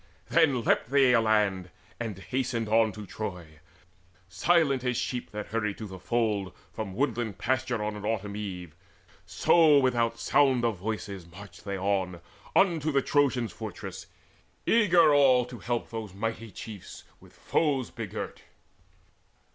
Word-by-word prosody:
Then 145 -8 +3
leapt - - +2
they 135 -2 +5
aland, 105 -5 +2 0.3
and 110 -5 -4
hasted 115 +4 -2
on 110 0 +3
to 105 0 -8
Troy 90 -7 -7 0.7
Silent 140 - +2
as 125 -2 0
sheep 125 -1 -3
that 105 0 -6
hurry 105 -2 -1
to 110 - -7
the 95 -2 -9
fold 105 -6 -1 0.2
From 100 -4 -5
woodland 120 -5 -1
pasture 125 -2 -1
on 105 0 -3
an 105 - -8
autumn 105 -2 -2
eve; 90 -6 -6 0.5
So 160 -4 +5
without 120 -3 +1
sound 130 -1 +3
of 110 -6 -1
voices 100 -3 -5
marched 90 +1 -13
they 100 -1 -3
on 95 -2 -1 0.4
Unto 160 -5 +3
the 140 -2 +2
Trojans' 130 -6 +1
fortress, - - -8 0.6
eager 175 -9 +5
all 130 -4 +5
To 125 -1 -10
help 120 -1 -3
those 110 -5 -6
mighty 115 +2 -4
chiefs 105 0 -9 0.2
with - - -18
foes 140 -6 0
begirt. - - -6
115 Hz, 140 wpm, -28 LUFS, 100-130 Hz, 0.7 s, they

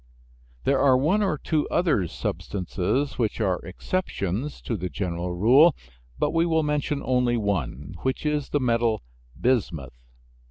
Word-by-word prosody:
There 135 0 +2
are 135 -2 +5
one 160 +11 +2
or 190 -7 +1
two 150 +1 0
other 155 - +2
substances 100 - -2
which 110 -2 0
are 95 -5 +1
exceptions 100 - -3
to 115 - -3
the 90 -2 -3
general 90 -2 -3
rule, 130 - +6 0.4
but - - +1
we 165 0 +2
will 160 -1 +2
mention 150 -1 -1
only 125 -2 +2
one, 80 - -2
which 130 +3 -2
is 150 -2 0
the 145 - +1
metal 115 - +1 0.4
bismuth. 80 - -1
125 Hz, 145 wpm, -25 LUFS, 95-150 Hz, 0.4 s, rule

